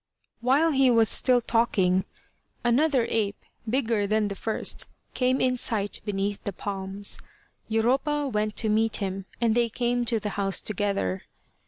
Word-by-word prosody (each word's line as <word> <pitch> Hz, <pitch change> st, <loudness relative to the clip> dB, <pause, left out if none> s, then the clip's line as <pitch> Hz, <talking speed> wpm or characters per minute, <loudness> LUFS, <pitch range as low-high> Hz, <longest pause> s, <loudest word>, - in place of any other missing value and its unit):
While 275 Hz, +7 st, +3 dB
he 270 Hz, -2 st, +4 dB
was 225 Hz, -3 st, +5 dB
still 250 Hz, -2 st, +4 dB
talking, 190 Hz, -6 st, +2 dB, 0.6 s
another 255 Hz, +1 st, +3 dB
ape, 210 Hz, -2 st, 0 dB, 0.3 s
bigger 225 Hz, -4 st, +1 dB
than 215 Hz, 0 st, +1 dB
the 200 Hz, -, -4 dB
first, 220 Hz, +2 st, -2 dB, 0.3 s
came 255 Hz, +1 st, +1 dB
in 255 Hz, -1 st, +2 dB
sight 210 Hz, -4 st, -1 dB
beneath 200 Hz, 0 st, -2 dB
the 200 Hz, -, -3 dB
palms. 195 Hz, +1 st, -3 dB, 0.5 s
Europa 265 Hz, +6 st, +1 dB
went 215 Hz, -3 st, -1 dB
to 225 Hz, -, +1 dB
meet 220 Hz, +1 st, +2 dB
him, 195 Hz, -1 st, -3 dB
and 230 Hz, -2 st, +2 dB
they 235 Hz, 0 st, +2 dB
came 240 Hz, +1 st, 0 dB
to 230 Hz, -1 st, +1 dB
the 210 Hz, -, -3 dB
house 195 Hz, -1 st, -1 dB
together. 195 Hz, -, -2 dB
220 Hz, 150 wpm, -26 LUFS, 200-245 Hz, 0.6 s, was